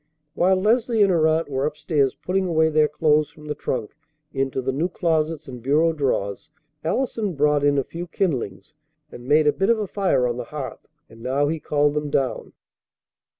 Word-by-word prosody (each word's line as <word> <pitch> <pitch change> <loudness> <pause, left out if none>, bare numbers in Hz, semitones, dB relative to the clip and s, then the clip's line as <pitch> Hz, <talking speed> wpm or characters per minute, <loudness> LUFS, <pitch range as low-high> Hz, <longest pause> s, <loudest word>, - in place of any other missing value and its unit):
While 190 +2 +3
Leslie 225 +3 +2
and 195 - +3
her 160 -3 +3
aunt 160 +1 +1
were 135 0 -1
up 150 0 -6
stairs 145 -5 +1
putting 190 +1 -1
away 160 -2 +3
their 155 -1 +3
clothes 150 0 +2
from 150 - -16
the 150 - -3
trunk 125 -6 -3 0.4
into 135 -1 -1
the 130 0 -1
new 155 +7 -1
closets 160 -3 -1
and 125 -2 -8
bureau 155 +6 +2
drawers, 125 -9 -2 0.3
Allison 210 +1 -1
brought 145 0 +2
in 145 0 +3
a 135 - +2
few 170 +6 -7
kindlings, 155 - -3 0.4
and 120 +1 -11
made 150 +2 +4
a 150 - +4
bit 195 +2 0
of 235 - +4
a 215 - -2
fire 185 -10 +1
on 120 -1 -1
the 125 - -4
hearth; 145 -1 -7 0.2
and 115 - -16
now 135 +4 0
he 160 0 -2
called 145 -1 +1
them 150 0 -2
down. 135 -3 -1
150 Hz, 195 wpm, -23 LUFS, 135-170 Hz, 0.4 s, made